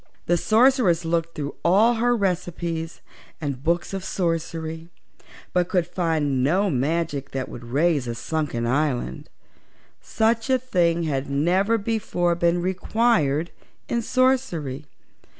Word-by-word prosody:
The 175 - +2
Sorceress 220 - +3
looked 165 0 -1
through 145 -1 -4
all 205 +7 +5
her 240 +1 +2
recipes 175 -4 -2 0.4
and 140 -4 -4
books 170 +4 0
of 195 -2 -3
sorcery, 165 -2 -3 0.6
but 180 0 +1
could 180 -3 +1
find 160 -7 0
no 185 +8 +2
magic 145 +1 -1
that 135 -1 -3
would 120 - -9
raise 145 +2 +1
a 120 - -3
sunken 125 -1 -2
island. 125 - -1 0.7
Such 225 +2 0
a 260 - +4
thing 175 -9 +1
had 140 -3 -2
never 180 +10 +2
before 200 -5 0
been 170 0 +1
required 185 - +1 0.4
in 235 - 0
sorcery. 220 - 0
170 Hz, 125 wpm, -24 LUFS, 150-195 Hz, 0.7 s, all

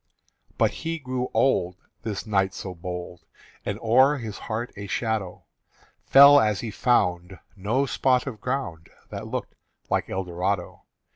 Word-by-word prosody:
But - - +3
he 165 0 -4
grew 130 -4 -3
old 90 -9 +1 0.2
This 110 -2 -4
knight 95 -3 +1
so 95 -1 -6
bold 90 0 -7 0.4
And - - -3
o'er 130 +6 +5
his 110 -5 -6
heart 115 +2 -4
a 100 0 -7
shadow 110 -4 -2 0.6
Fell 140 +1 +9
as 105 -6 +1
he 115 - -4
found 90 -7 +1 0.2
No 110 +8 0
spot 130 -2 +1
of 125 -6 -7
ground 125 -11 -3 0.2
That - - -6
looked - - -4 0.4
like - - 0
Eldorado. 90 0 -3
110 Hz, 140 wpm, -25 LUFS, 95-130 Hz, 0.6 s, Fell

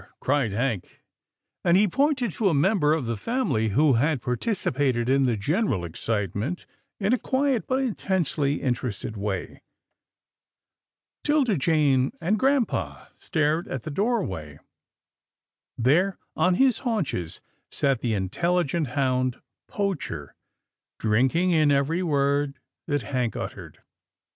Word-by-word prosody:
" - - -47
cried 135 -5 +1
Hank, 115 -2 -3 0.6
and 170 +1 +4
he 210 +2 +4
pointed 260 - +1
to 200 +3 +1
a 165 - +1
member 150 0 +3
of 150 -6 -3
the 115 0 -2
family 115 - 0
who 140 +6 +4
had 140 +4 +2
participated 125 - -1
in 135 0 +3
the 115 -3 +1
general 140 - 0
excitement 105 - -3 0.3
in 205 +3 +1
a 255 - +2
quiet, 265 -3 0
but 265 +1 +1
intensely 170 - -1
in 130 - +2
terested 110 -2 -5
way. 100 -3 -4 1.6
'Tilda 290 -8 +2
Jane 140 -3 +2
and 195 +6 0
grampa 270 -1 0
stared 155 +2 0
at 130 -3 -5
the 155 - -5
doorway. 140 - -2 1.2
There, 170 +11 +2 0.2
on 180 0 +3
his 255 +1 +3
haunches, 185 - -2 0.3
sat 135 -3 +1
the 115 -3 0
intelligent 170 - 0
hound 130 -2 +1 0.3
Poacher, 175 - -3 0.6
drinking 130 +12 +2
in 155 -3 +4
every 145 +5 +2
word 140 -3 +1 0.3
that 145 -3 0
Hank 125 -4 -2
uttered. - - -7
145 Hz, 125 wpm, -25 LUFS, 125-190 Hz, 1.6 s, and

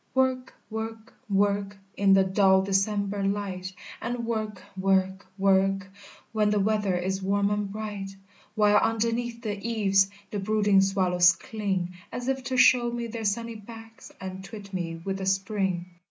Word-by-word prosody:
"Work 260 -1 +1 0.2
work 225 +1 -6 0.2
work 200 0 +1 0.2
In 195 -1 +4
the 195 0 +6
dull 190 0 +4
December 200 +1 0
light! 195 -2 -2 0.3
And 240 0 -3
work 215 -4 -3
work 190 0 +1
work 195 0 +2 0.4
When 215 -2 +2
the 210 0 +2
weather 205 -2 +1
is 190 +2 -2
warm 200 +1 +1
and 205 -1 -1
bright! 205 -2 -5 0.5
While 210 -1 +5
underneath 230 +1 0
the 205 -2 -3
eaves 195 -4 +2 0.2
The 205 - -2
brooding 205 -1 +3
swallows 180 -2 +4
cling, 190 -2 -3 0.2
As 245 0 -5
if 265 -1 -1
to 260 0 -1
show 245 -1 +6
me 235 0 -3
their 230 -1 -5
sunny 230 +3 -1
backs, 225 +1 -12
And 190 0 -6
twit 200 -1 -10
me 165 -3 -3
with 195 0 -2
the 190 - -3
Spring. 195 -2 0
200 Hz, 155 wpm, -27 LUFS, 195-220 Hz, 0.5 s, the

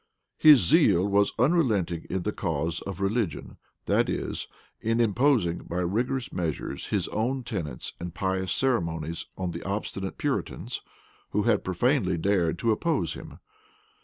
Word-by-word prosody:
His 150 -6 +8
zeal 100 - +4
was 100 0 +3
unrelenting 115 - +2
in 95 -1 -2
the 105 - 0
cause 80 -4 -2
of 100 -1 -5
religion; 100 -3 -1 0.3
that - - +2
is, - - -3 0.3
in 115 +1 0
imposing 115 -5 +2
by 85 - -6
rigorous 120 +9 -1
measures 80 -4 -3
his - - 0
own 125 +5 -1
tenets 80 - -4
and 85 0 -5
pious 95 0 -1
ceremonies 85 - -1
on 90 -2 -2
the - - -6
obstinate 95 -1 -4
Puritans, - - -3 0.5
who - - +2
had - - +2
profanely 95 0 +1
dared 85 -2 +1
to 115 - +1
oppose 160 +9 0
him. - - -10
100 Hz, 140 wpm, -27 LUFS, 85-120 Hz, 0.5 s, His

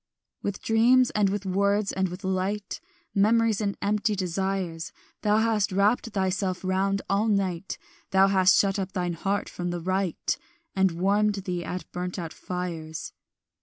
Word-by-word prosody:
"With 200 0 -4
dreams 240 +3 +4
and 205 -2 +2
with 200 0 -3
words 200 +2 +1
and 190 -1 0
with 180 +2 -8
light 190 +2 -2 0.3
Memories 220 +1 +3
and 200 -1 -1
empty 210 +1 +1
desires 185 -2 -2 0.3
Thou 210 0 +3
hast 220 -3 +2
wrapped 205 +5 +2
thyself 190 -2 -1
round 195 +1 0
all 200 +3 +1
night; 195 -3 -1 0.3
Thou 190 0 +5
hast 190 0 +5
shut 200 0 +2
up 190 0 -4
thine 180 -3 -1
heart 195 +4 -1
from 175 0 -4
the 175 0 -2
right, 185 0 -1 0.4
And 190 -2 +3
warmed 200 +4 +2
thee 180 -3 -2
at 180 -1 -5
burnt 180 +1 -4
out 165 -3 -5
fires. 165 -4 -5
195 Hz, 155 wpm, -26 LUFS, 180-205 Hz, 0.4 s, Thou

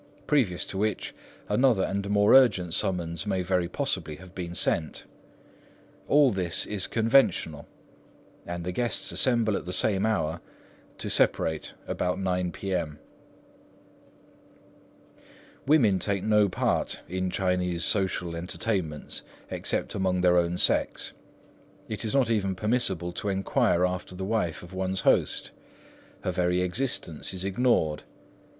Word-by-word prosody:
previous 115 -12 +1
to 95 - -5
which 105 -1 -1 0.3
another 110 -2 +3
and 100 0 -2
more 105 0 +4
urgent 105 -10 +5
summons 85 0 -1
may 95 -2 0
very 90 -1 0
possibly 90 - -2
have 90 +3 -14
been 90 -2 -6
sent. 80 -1 0 1.0
All 145 -2 +5
this 90 -4 0
is 100 -3 -1
conventional, 115 - +2 0.8
and 85 0 -4
the 90 - -3
guests 100 -2 -1
assemble 115 -5 +2
at - - -4
the 90 - -5
same 95 +1 +2
hour, 85 -6 -1 0.6
to - - -4
separate 80 -1 +1
about 90 0 -2
9 90 -2 -1
P.M. 85 -7 -3 2.7
Women 120 -11 +4
take 100 -1 -1
no 105 -2 +3
part 90 - 0
in 95 +1 -2
Chinese 90 -2 0
social 95 -4 0
entertainments 85 -2 -3 0.3
except - - -2
among 95 -1 0
their 90 -1 +4
own 85 +1 -1
sex. - - +1 0.7
It 110 - -4
is 110 +3 -1
not 135 -4 +3
even 100 -4 0
permissible 95 -5 0
to 100 +4 -4
enquire 95 -2 +2
after 90 0 -4
the 95 +1 -4
wife 100 -7 -1
of 85 +2 -12
one's 95 0 -1
host. - - +1 0.7
Her 90 - -1
very 90 0 +1
existence 90 - -2
is 95 0 -4
ignored. 95 -8 +1
95 Hz, 130 wpm, -27 LUFS, 90-105 Hz, 2.7 s, urgent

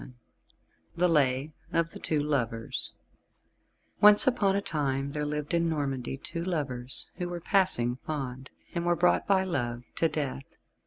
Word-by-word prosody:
VII 125 - -11 0.8
THE 180 +2 +3
LAY 145 -2 +2 0.2
OF 165 -1 +1
THE - - -9
TWO 155 - -1
LOVERS 125 -6 -2 1.1
Once 210 0 +8
upon 205 -7 +2
a - - +2
time 140 -4 -1
there 150 0 -2
lived 150 +1 -3
in 170 0 +2
Normandy 135 -4 -2
two 165 +4 -5
lovers, 135 -8 -3
who 180 -1 -3
were 175 -1 -4
passing 160 - +3
fond, 130 -2 -5 0.2
and 170 - -2
were 175 0 +2
brought 85 - +2
by 190 -1 +3
Love 120 -9 -2
to 165 - +3
Death. 140 -3 -4
150 Hz, 155 wpm, -28 LUFS, 130-170 Hz, 1.1 s, Once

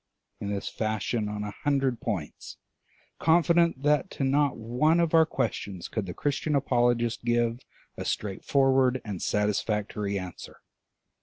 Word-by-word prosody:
in 100 - -4
this 100 -1 -3
fashion 110 0 -2
on 105 0 -4
a 105 - -4
hundred 135 -4 +1
points, 100 - -5 0.6
confident 170 -2 +3
that 150 -1 +2
to - - -4
not 140 0 +2
one 125 +9 +2
of 170 -1 +1
our 160 -1 +6
questions 95 - -3
could 110 -4 -3
the 90 - -5
Christian 145 +1 -1
apologist 120 -4 +1
give 120 0 +1 0.4
a - - -4
straightforward 130 +5 +1
and 100 -4 -5
satisfactory 105 -1 -1
answer. 90 -2 -8
120 Hz, 135 wpm, -27 LUFS, 105-140 Hz, 0.6 s, our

